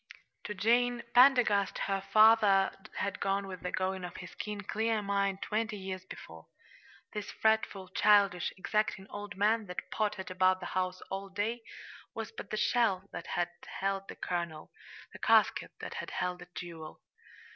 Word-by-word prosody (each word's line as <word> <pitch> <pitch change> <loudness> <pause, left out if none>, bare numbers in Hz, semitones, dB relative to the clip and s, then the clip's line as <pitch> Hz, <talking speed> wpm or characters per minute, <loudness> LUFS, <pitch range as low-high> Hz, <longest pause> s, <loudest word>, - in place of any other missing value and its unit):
To 210 - -4
Jane 240 +4 +2
Pendergast 245 -6 +5
her 195 -1 -1
father 205 -1 +5 0.2
had 200 - -2
gone 195 0 0
with 185 -2 -8
the 180 - -3
going 190 0 -1
of 180 - -7
his 180 - -9
keen, 210 -1 -5
clear 220 +2 0
mind, 200 -1 0
twenty 220 0 -1
years 190 -1 -6
before. 80 - -11 0.7
This 210 -1 -4
fretful, 220 -3 +1
childish, 200 -3 +4
exacting 210 0 -1
old 205 0 -7
man 215 +1 +2
that 180 - -6
pottered 205 -3 -2
about 185 0 +3
the 180 - -7
house 185 0 -1
all 195 +1 -4
day 210 +5 -2 0.5
was - - -5
but 445 - -9
the 215 - -2
shell 205 -5 +1
that - - -6
had 175 0 -1 0.3
held 195 0 -1
the - - -8
kernel 170 -3 -4 0.4
the - - -10
casket - - +3
that - - -6
had - - -5
held 180 -1 -2
the 180 - -11
jewel. 165 -3 -8
195 Hz, 160 wpm, -31 LUFS, 185-215 Hz, 0.7 s, Pendergast